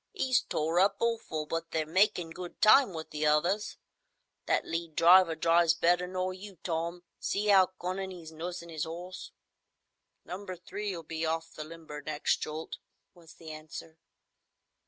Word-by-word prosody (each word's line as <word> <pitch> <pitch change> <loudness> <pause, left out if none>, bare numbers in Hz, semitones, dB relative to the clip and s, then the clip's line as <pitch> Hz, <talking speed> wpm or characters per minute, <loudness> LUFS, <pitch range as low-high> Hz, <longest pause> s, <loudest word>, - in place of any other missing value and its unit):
"'E's 260 -8 +2
tore 160 +3 0
up 195 +2 +4
awful, 225 -10 -1
but 165 +2 -3
they're 160 -1 -1
makin' 175 0 +2
good 175 +1 -8
time 225 +2 +7
with 160 -2 -7
the 150 0 -3
others. 170 +8 +2 0.7
That - - +2
lead 165 -1 -4
driver 175 0 +7
drives 165 0 +4
better 175 +2 +2
nor 185 0 -2
you, 190 0 -10
Tom. 170 +1 -2 0.2
See 205 +1 +1
'ow 190 -2 +7
cunnin' 190 +2 -3
'e's 170 -3 -9
nursin' 170 +1 -6
'is 160 -1 -2
'orse." 175 +3 -7 1.0
"Number 185 +1 -6
Three'll 185 0 -5
be 160 +1 -4
off 165 0 -2
the 155 - -6
limber, 155 -2 -9
next 155 0 0
jolt," 155 +1 -5 0.4
was 170 -2 -16
the 160 -1 -10
answer. 155 +1 -9
170 Hz, 155 wpm, -30 LUFS, 160-185 Hz, 1.0 s, time